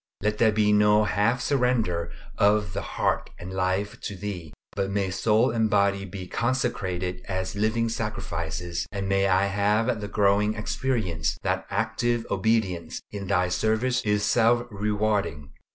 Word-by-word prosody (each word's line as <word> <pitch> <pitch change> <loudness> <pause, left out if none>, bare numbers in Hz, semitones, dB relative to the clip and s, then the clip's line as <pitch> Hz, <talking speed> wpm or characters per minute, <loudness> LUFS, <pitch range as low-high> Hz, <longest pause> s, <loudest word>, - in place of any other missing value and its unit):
Let 105 0 0
there 110 -2 +5
be 105 0 +3
no 105 +1 +5
half 105 +4 +1
surrender 120 - 0 0.2
of 105 -2 +2
the 100 - -2
heart - - -1
and 90 +1 -8
life 95 +2 -1
to 100 - -5
Thee, 90 -5 -6 0.2
but 100 -1 -1
may 100 -1 -1
soul 110 +5 +2
and 110 -1 +1
body 100 -1 +2
be 95 0 -7
consecrated 95 -6 -2
as 95 -1 -3
living 110 +3 +1
sacrifices, 85 -6 -3
and 100 -1 -3
may 95 0 +2
I 95 +1 +3
have 105 +3 +1
the 105 - -4
growing 105 +1 +2
experience 105 -8 -1
that - - -1
active 115 +3 0
obedience 95 -5 0
in 100 -2 -6
Thy 90 -2 +2
service 110 +6 +1
is 105 -1 +1
self 120 +1 +3
rewarding. 105 -7 -1
105 Hz, 150 wpm, -26 LUFS, 95-110 Hz, 0.2 s, there